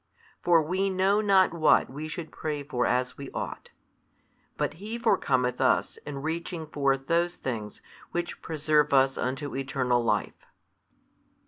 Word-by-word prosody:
For 170 -2 +4
we 190 +5 0
know 190 +2 +2
not 195 -4 +4
what 160 -2 +4
we 150 +4 -6
should 160 0 -6
pray 150 -2 -4
for 125 -4 -1
as 125 +1 0
we 140 - -6
ought, - - -5 0.9
but - - -2
He 220 +3 -4
forecometh 130 - +1
us - - +2
in 140 -1 -5
reaching 165 +1 -3
forth 140 -3 0
those 170 +2 +1
things 110 -5 -5 0.3
which 175 0 -4
preserve 150 -2 +1
us 135 0 +4
unto 135 +3 -3
eternal 130 -3 0
life. 115 - -1
150 Hz, 140 wpm, -27 LUFS, 135-170 Hz, 0.9 s, For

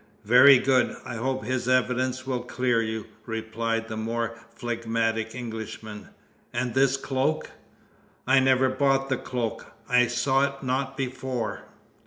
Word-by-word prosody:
"Very 130 +5 +8
good! 130 0 +2
I 120 - -5
hope 130 0 -2
his 130 0 -2
evidence 130 0 +1
will 130 -2 -2
clear 120 -1 0
you," 110 -1 -3 0.2
replied 115 0 -2
the 110 - -5
more 115 +1 -2
phlegmatic 115 -1 -2
Englishman. 110 -3 -7 0.4
"And 120 0 -2
this 135 +1 +3
cloak?" 135 +3 -1 0.7
"I 130 +1 +5
never 130 0 +4
bought 135 0 +1
the 130 - +1
cloak! 120 -3 -4
I 125 0 +4
saw 130 +3 +2
it 140 0 -9
not 135 +1 -2
before!" 130 -3 -3
125 Hz, 135 wpm, -26 LUFS, 115-130 Hz, 0.7 s, Very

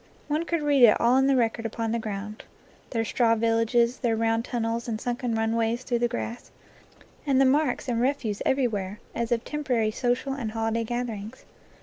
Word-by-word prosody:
One 305 +3 -1
could 335 -3 -1
read 290 -2 +3
it 225 - +7
all 235 +2 +4
in 265 0 +4
the 275 - +4
record 230 -2 +1
upon 225 0 -3
the 235 - 0
ground: 210 0 -6 0.5
their 225 -2 -1
straw 230 +1 +2
villages, 230 +2 +2
their 235 -3 +1
round 225 0 +1
tunnels 230 -1 -2
and 220 -2 -2
sunken 245 -1 -2
runways 225 +2 0
through 240 -2 -1
the 240 - +2
grass, 235 0 -5 0.7
and 275 -3 +2
the 270 - +5
marks 275 -1 +1
and 235 -2 0
refuse 245 -6 -1
everywhere, 210 -7 0
as 235 0 -3
of 235 0 +1
temporary 250 -8 0
social 245 +4 -1
and 235 -6 -4
holiday 225 0 -1
gatherings. 235 -1 -5
235 Hz, 185 wpm, -26 LUFS, 225-255 Hz, 0.7 s, it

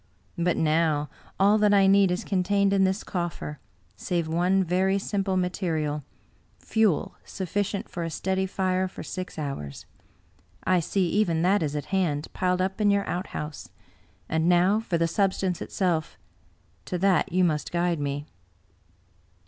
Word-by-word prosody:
But 175 0 +1
now, 155 -2 +1 0.3
all 205 +2 +5
that 210 -1 +4
I 195 -1 +5
need 195 0 +5
is 180 +1 -1
contained 200 +1 +1
in 195 -1 +4
this 190 +3 0
coffer, 170 -5 -4 0.4
save 170 -3 -2
one 180 +4 +2
very 185 +2 +1
simple 195 -1 -1
material 160 -5 -1 0.3
— - - -36
fuel 220 -7 +1
sufficient 200 +2 -3
for 175 - -6
a 165 - -2
steady 190 +4 -1
fire 185 0 0
for 185 - -9
six 185 -2 -6
hours. 135 - -5 0.8
I 185 -1 +3
see 180 +2 0
even 170 -5 +1
that 195 +2 +3
is 150 -2 -2
at 145 - -3
hand, 160 -6 0
piled 180 0 +1
up 190 +3 -3
in 205 - +4
your 200 0 +2
outhouse. 155 -4 -5 0.6
And 160 +2 +1
now 180 +4 +4
for 190 -6 -1
the 165 0 +2
substance 190 -1 0
itself 170 -5 -1 0.3
— - - -37
^to 180 - -2
that 195 +1 +2
you 185 +1 +3
must 155 -4 0
guide 175 -1 0
me." 145 0 -3
180 Hz, 155 wpm, -26 LUFS, 165-195 Hz, 0.8 s, all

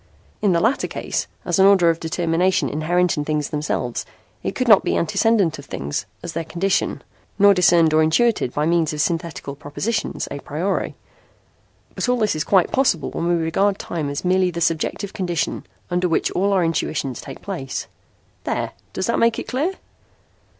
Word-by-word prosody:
In 205 - +3
the 170 - +3
latter 230 +10 +1
case, - - -3 0.2
as 175 +1 0
an 190 - +7
order 185 -4 +5
of 165 - -5
determination 170 +2 +1
inherent 175 +4 +1
in 150 - 0
things 150 0 -2
themselves, 145 -5 -2 0.4
it - - -3
could 255 - -1
not 215 -4 +7
be - - 0
antecedent 195 +1 +2
to 145 - -7
things, 70 - -4 0.2
as 170 - -5
their 165 - -2
condition, 175 +4 -1 0.3
nor 205 0 +7
discerned 170 -3 +4
or 155 - +5
intuited 160 - +2
by 150 +3 -1
means 165 -2 +2
of 150 - -1
synthetical 165 -4 -2
propositions 150 +11 -3
a 140 - -4
priori. 170 +8 -2 1.0
But - - -2
all 250 - +3
this 215 -6 +1
is 155 - -1
quite 190 -3 +3
possible 255 - +1
when 170 - -2
we 175 - +3
regard 180 +5 +1
time 155 -4 -4
as 140 +5 -4
merely 185 0 +3
the 170 -1 -4
subjective 170 +4 -1
condition 175 -4 -2 0.2
under 180 0 +1
which 165 - +1
all 200 +2 +1
our 190 -3 +3
intuitions 155 -5 -1
take 135 - -10
place.' 170 -10 -4 0.6
"There. - - -2 0.2
Does 190 - -2
that 235 - 0
make 230 0 +3
it - - -5
clear?" 295 +9 -1
170 Hz, 180 wpm, -21 LUFS, 155-195 Hz, 1.0 s, an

